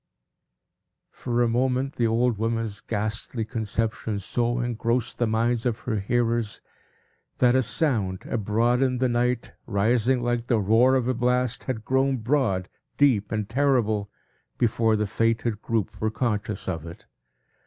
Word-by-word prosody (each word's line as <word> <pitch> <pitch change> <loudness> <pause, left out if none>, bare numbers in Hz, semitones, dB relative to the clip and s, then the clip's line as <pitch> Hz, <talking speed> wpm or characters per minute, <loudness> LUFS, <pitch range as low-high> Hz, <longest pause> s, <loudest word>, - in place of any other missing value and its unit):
For 120 0 -1
a - - +2
moment, 130 +3 0
the 115 - +2
old 115 -1 +1
woman's 115 -2 -1
ghastly 110 +1 -3
conception 110 -1 -2
so 120 +4 -1
engrossed 120 +1 -1
the 120 - +2
minds 115 +1 +1
of 120 -3 -1
her 110 -4 -2
hearers, 115 +1 0 0.8
that 125 -1 +4
a 130 - +4
sound, 115 - 0
abroad 115 +3 +1
in 130 -1 +2
the 130 +1 +2
night, 120 0 0 0.2
rising 120 +5 +2
like 120 -1 -1
the 120 -4 +2
roar 115 +6 +4
of 125 -2 +1
a 130 - +2
blast, 125 +1 0
had 110 -4 -4
grown 135 0 +2
broad, 115 -7 0 0.3
deep, 120 -8 +3
and 105 -2 -2
terrible, 115 -6 +1 0.5
before 115 -1 +2
the 105 0 0
fated 115 +1 0
group 115 -4 -2
were 110 - +1
conscious 105 -3 -2
of 80 -5 -3
it. 85 - -11
115 Hz, 145 wpm, -25 LUFS, 110-125 Hz, 0.8 s, that